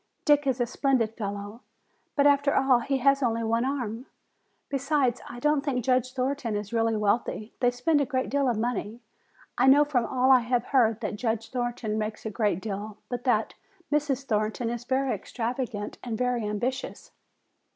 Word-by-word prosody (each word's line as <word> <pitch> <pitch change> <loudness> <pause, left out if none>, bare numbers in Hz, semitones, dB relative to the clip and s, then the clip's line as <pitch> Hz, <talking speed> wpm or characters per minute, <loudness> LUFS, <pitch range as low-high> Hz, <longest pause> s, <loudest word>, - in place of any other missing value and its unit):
Dick 290 -2 +4
is 260 -1 +1
a 245 - +2
splendid 245 -2 0
fellow, 205 +1 -5 0.5
but 285 - +3
after 285 0 +4
all 265 -2 +4
he 270 +3 -1
has 275 +2 +3
only 230 -2 0
one 230 +1 +1
arm. 255 -3 -3 0.6
Besides, 275 -3 0
I 240 - -8
don't 295 +2 +2
think 250 -5 -1
Judge 255 -1 +1
Thornton 260 -3 -1
is 205 +1 -4
really 225 -1 +1
wealthy. 210 +1 -1
They 245 - +4
spend 265 +5 +1
a - - +1
great 260 -2 -1
deal 280 -1 +2
of 235 - 0
money. 230 -1 -2 0.6
I 255 - +4
know 285 +2 +7
from 250 -5 0
all 260 0 +3
I 260 - +8
have 240 0 0
heard 230 -5 +2
that 210 -1 -3
Judge 225 -1 -2
Thornton 240 -3 -2
makes 215 +1 -4
a 220 - -3
great 205 -4 0
deal, 210 0 -5
but 245 0 -4
that 225 -4 +1 0.4
Mrs. 290 -3 0
Thornton 220 +1 -1
is 240 0 -5
very 265 +1 +1
extravagant 235 -3 -4
and 230 -3 -3
very 250 -2 0
ambitious." 245 +6 -4
245 Hz, 180 wpm, -27 LUFS, 225-270 Hz, 0.6 s, I